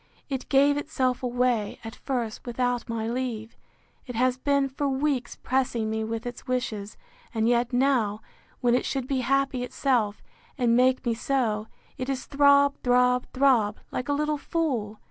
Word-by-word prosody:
—It 265 -2 -4
gave 285 +1 +4
itself 255 -3 -1
away, 245 -4 0
at 225 0 -7
first, 240 -5 -3
without 245 0 -1
my 225 -1 -2
leave; 235 -2 -3 0.5
it 245 - -6
has 250 +2 +2
been, 280 +1 +1
for 275 +1 -2
weeks, 270 -2 -1
pressing 240 -4 -1
me 220 0 -1
with 225 +1 -4
its 245 +2 -7
wishes; 225 -5 -3 0.4
and 220 0 +2
yet 240 +1 +2
now, 245 -5 +2 0.4
when 240 -1 +3
it 250 - +2
should 270 -2 -2
be 270 -1 0
happy 275 0 +1
itself, 245 -5 0 0.3
and 240 -3 +3
make 255 +1 +3
me 235 - +2
so, 225 -3 -1 0.3
it 255 +1 -3
is 265 -1 -2
throb, 280 0 +4
throb, 250 0 +3
throb, 250 -6 +3
like 250 - -4
a - - +3
little 300 0 0
fool! 250 -12 -2
250 Hz, 165 wpm, -26 LUFS, 230-270 Hz, 0.5 s, gave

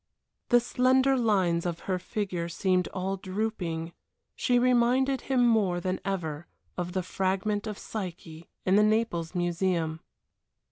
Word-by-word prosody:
The 245 - +6
slender 260 +2 +3
lines 190 -8 +2
of 170 -2 -3
her 185 -2 -2
figure 180 -3 -3
seemed 185 +1 +1
all 190 +1 -3
drooping. 185 -4 -3 0.4
She 250 -2 +2
reminded 255 +2 +3
him 255 -2 +2
more 200 -6 +2
than 185 +1 -2
ever 170 -5 -3 0.3
of 180 -1 -4
the 185 -1 -1
fragment 195 +3 -1
of 210 -2 -4
Psyche 175 -5 -7 0.2
in 190 +2 +4
the 210 - +6
Naples 215 -6 0
Museum. 175 -2 0
190 Hz, 135 wpm, -28 LUFS, 175-225 Hz, 0.4 s, The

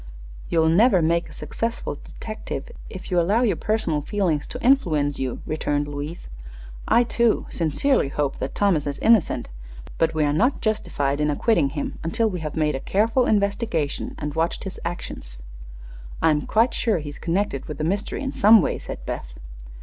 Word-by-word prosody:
"You'll 160 -1 +3
never 190 +5 +5
make 170 +2 +1
a - - -13
successful 230 -10 -4
detective 220 - -7 0.2
if 185 - -9
you 180 - +3
allow 205 +8 +2
your 230 - +2
personal 215 -9 -1
feelings 165 -3 -1
to - - -6
influence 155 - +2
you," 130 -2 -3
returned 145 -1 -1
Louise. 145 +3 -6 0.6
"I, 240 - +5
too, 235 -1 +1
sincerely 170 - +1
hope 140 -1 -2
that 135 - -4
Thomas 180 -8 +2
is 140 - -3
innocent; 225 -6 +3 0.5
but 165 -1 +2
we 155 - +2
are 145 -1 +2
not 245 - +2
justified 145 -10 -1
in 150 - +2
acquitting 150 -1 +2
him 145 - -4
until 225 +8 +1
we 185 -4 -3
have 155 -2 -5
made 155 -1 +1
a 135 - -2
careful 225 - +1
investigation 200 -7 0
and 150 -1 -4
watched 165 +3 -1
his 190 - -7
actions." - - -6 0.8
"I'm 150 -2 +2
quite 230 +3 +3
sure 225 -5 +1
he's 145 -2 -7
connected 175 -5 -1
with 150 - -6
the 155 - -3
mystery 200 - -2
in 270 - -3
some 215 +2 +7
way," 175 - 0
said - - -8
Beth. 60 - -5
170 Hz, 175 wpm, -23 LUFS, 150-215 Hz, 0.8 s, some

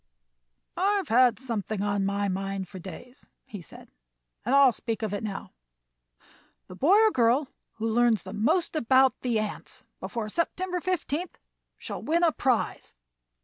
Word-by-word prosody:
"I've 390 -1 +1
had 245 0 +5
something 220 -5 -3
on 200 -1 0
my 200 0 0
mind 195 0 -3
for 190 +1 -10
days," 195 - -11 0.2
he 205 -4 -9
said, 165 - -14 0.5
"and 250 +5 +1
I'll 275 -2 +7
speak 225 -1 -4
of 210 -2 -2
it 205 - -2
now. 205 -3 -5 1.1
The 185 - -11
boy 345 - +4
or 440 - +5
girl 250 - +2 0.2
who 225 0 -3
learns 230 -1 +2
most 220 - 0
about 260 -1 +3
the 240 -3 0
ants 215 -1 -5
before 230 -3 -4
September 360 - -2
15th 355 -1 -3 0.4
shall - - -6
win 335 +3 +1
a 335 - +5
prize. 255 -6 -1
235 Hz, 145 wpm, -27 LUFS, 205-295 Hz, 1.1 s, I'll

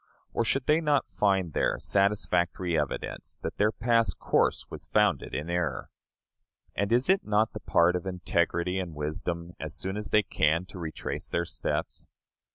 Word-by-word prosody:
Or 115 - +1
should 125 +4 0
they 155 +2 +3
not 150 -3 +1
find 95 -6 +1
there - - +1
satisfactory 95 -3 +1
evidence 75 -3 -3
that - - -4
their 105 +1 +3
past 115 -4 +1
course - - +1
was - - -8
founded - - +1
in 75 +4 -3
error? 85 -7 -2 0.8
And 100 +2 -1
is 125 +2 +3
it 190 +1 +3
not 105 +1 +1
the - - -5
part 85 +1 +3
of 90 +1 -3
integrity 90 0 0
and 85 -4 -5
wisdom, 85 +3 -3
as - - -5
soon 95 +2 -3
as 105 0 -5
they 105 - +4
can, 80 -1 +1
to 95 - -9
retrace 80 -3 -5
their 85 - 0
steps? - - -3
90 Hz, 165 wpm, -28 LUFS, 85-105 Hz, 0.8 s, they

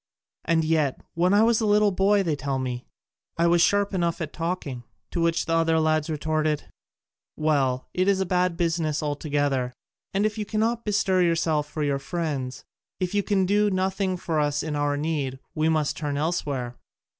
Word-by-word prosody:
And 165 -1 +2
yet, 155 -4 +1
when 175 +2 +2
I 205 +2 +5
was 230 0 +3
a 220 - +1
little 210 0 +4
boy, 195 +2 +3
they 160 -4 0
tell 140 -1 -2
me, 125 -1 -4 0.5
I 170 - +3
was 170 0 +4
sharp 205 +2 +3
enough 170 -3 0
at 155 -3 -4
talking." 165 -7 -3 0.3
To 170 - -1
which 165 0 +1
the 165 - -1
other 165 0 +3
lads 155 0 +1
retorted, 155 0 0 0.7
"Well, 140 -5 +1
it 185 +1 +1
is 200 -1 +3
a 190 - +1
bad 180 -1 +1
business 165 -3 0
altogether: 145 -3 -1 0.4
and 200 +2 +1
if 215 0 -1
you - - 0
cannot 225 +3 -1
bestir 195 -3 +2
yourself 165 -3 +1
for 155 - -3
your 140 -1 0
friends, 140 -4 -3 0.4
if 185 0 -2
you 205 - +2
can 195 -2 +1
do 205 +2 +3
nothing 190 0 0
for 165 -3 -1
us 145 -1 0
in 155 -1 -3
our 145 0 0
need, 145 -4 -2 0.2
we 155 +1 +1
must 155 -2 +1
turn 145 -2 -2
elsewhere." 140 -6 -2
165 Hz, 185 wpm, -25 LUFS, 145-185 Hz, 0.7 s, I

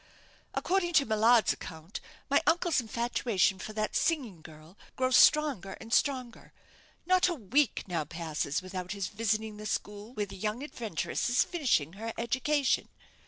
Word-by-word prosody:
According 355 -2 0
to 285 -4 +5
Millard's 220 +1 +4
account 160 +4 -8 0.3
my - - +3
uncle's 340 -4 +3
infatuation 225 -4 0
for 215 - -6
that 215 0 -2
singing 250 - 0
girl 155 +2 -14 0.2
grows 255 -1 +2
stronger 270 -14 +4
and 225 +4 -8
stronger. 255 -4 0 0.5
Not 370 +1 +4
a 350 - -1
week 260 - +1
now 170 -5 -2
passes 160 -2 -3
without 185 0 -5
his 200 -2 -3
visiting 215 0 -1
the 210 0 -6
school 210 +3 -4
where 210 - -1
the 195 -1 -11
young 215 +6 -3
adventuress 230 - -3
is 245 - +4
finishing 240 - 0
her 225 +3 -5
education. 260 +4 0
220 Hz, 150 wpm, -30 LUFS, 190-260 Hz, 0.5 s, to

